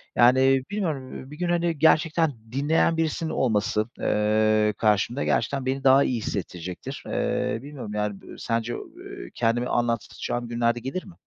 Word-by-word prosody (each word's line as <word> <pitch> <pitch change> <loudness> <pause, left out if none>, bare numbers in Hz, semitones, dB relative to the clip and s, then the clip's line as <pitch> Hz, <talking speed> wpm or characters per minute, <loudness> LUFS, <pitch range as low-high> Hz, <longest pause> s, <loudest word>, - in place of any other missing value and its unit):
Yani, 130 +2 +5
bilmiyorum, 160 -11 -3
ııı, 135 +2 -11
bir 150 - -9
gün, 175 -1 -1
hani, 170 -2 0
gerçekten 160 0 +3 0.2
dinleyen 150 +5 +2
birisinin 160 0 -1
olması, 110 -4 +1
eee, 105 0 +2
karşımda 110 +4 +1
gerçekten 135 -2 0
beni 135 +1 -1
daha 135 +1 +6
iyi 125 - 0
hissettirecektir. 90 -4 -5
Eee, 110 - -1
bilmiyorum 135 -6 -8
yani 105 -2 -2
b - - -17
sence, 115 +1 -2
eee, 385 +2 -9
kendimi 120 +1 +1
anlatacağım 120 0 -2
günlerde 120 0 0
gelir 135 +10 -5
mi? 190 - -12
130 Hz, 150 wpm, -25 LUFS, 115-155 Hz, 0.2 s, daha